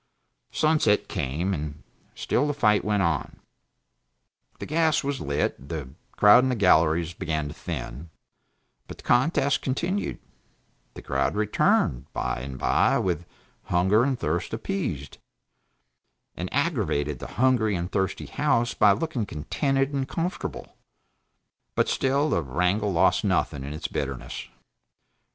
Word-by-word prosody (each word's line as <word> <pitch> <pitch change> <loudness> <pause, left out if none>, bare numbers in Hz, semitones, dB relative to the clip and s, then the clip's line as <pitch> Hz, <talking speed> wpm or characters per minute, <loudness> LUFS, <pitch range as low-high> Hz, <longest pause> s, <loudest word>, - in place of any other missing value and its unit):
Sunset 155 -9 +2
came, 80 +9 -2
and 75 -2 -5 0.3
still 145 - 0
the 145 - -1
fight 105 -7 +3
went 105 -2 +1
on; 85 -5 -1 1.2
the - - -6
gas 160 0 +2
was 140 -1 -2
lit, 70 -1 -2
the 75 -6 -5 0.2
crowd 105 +5 +7
in 130 - +1
the 125 - +1
galleries 85 -4 +3
began 80 -2 -2
to 75 - -7
thin, 70 +8 -6 0.8
but - - -9
the - - -14
contest 140 +2 +2
continued; 170 +9 -2 0.8
the - - -9
crowd 70 +6 0
returned, 105 - +1
by 60 - -2
and 65 +1 -6
by, 135 - +2
with 90 - -1 0.4
hunger 95 +6 +3
and 135 -1 0
thirst - - -2
appeased, 130 - -4 1.2
and - - -5
aggravated 70 -2 0
the - - -7
hungry 120 -4 +3
and 85 +1 -3
thirsty 95 -2 -1
House 120 0 +1
by 105 -1 +5
looking 120 -2 -2
contented 135 - -1
and 135 -1 -2
comfortable; 175 +3 -4 1.0
but - - +2
still 140 +3 +1
the 85 - +2
wrangle 90 +9 0
lost 95 +1 +3
nothing 70 -2 0
of 70 - -6
its 75 +2 -4
bitterness. 70 -3 -5
100 Hz, 135 wpm, -26 LUFS, -, 1.2 s, crowd